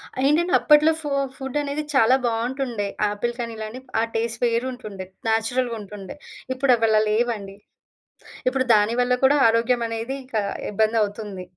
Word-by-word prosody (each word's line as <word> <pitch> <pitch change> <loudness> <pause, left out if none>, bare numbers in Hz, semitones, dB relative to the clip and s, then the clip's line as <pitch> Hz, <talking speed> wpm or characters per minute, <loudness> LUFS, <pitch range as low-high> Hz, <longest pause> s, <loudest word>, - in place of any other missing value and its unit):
ఆహ్, 260 - -2
ఏంటంటే, 340 +5 +2
అప్పట్లో 300 +1 +5
ఫో 295 - -4 0.3
ఫుడ్డనేది 285 +2 -3
చాలా 255 -1 +5
బావుంటుండే. 235 -2 -2 0.2
ఆపిల్ 220 +4 -2
కానీ 230 -1 -3
ఇలాని, 220 +3 -6 0.2
ఆ - - +3
టేస్ట్ 230 0 -2
వేరుంటుండే, 230 -5 -3 0.2
న్యాచురల్‌గుంటుండే. 220 -4 -2 0.4
ఇప్పుడవలా 230 -5 +3
లేవండి. 215 -3 -1 0.9
ఇప్పుడు 260 0 +1
దాని 210 +2 +2
వల్ల 245 0 +2
కూడా 290 +2 +5
ఆరోగ్యమనేది 230 +1 0
ఇంక 255 -2 -11 0.4
ఇబ్బందవుతుంది. 210 -2 -1
230 Hz, 120 wpm, -23 LUFS, 215-260 Hz, 0.9 s, అప్పట్లో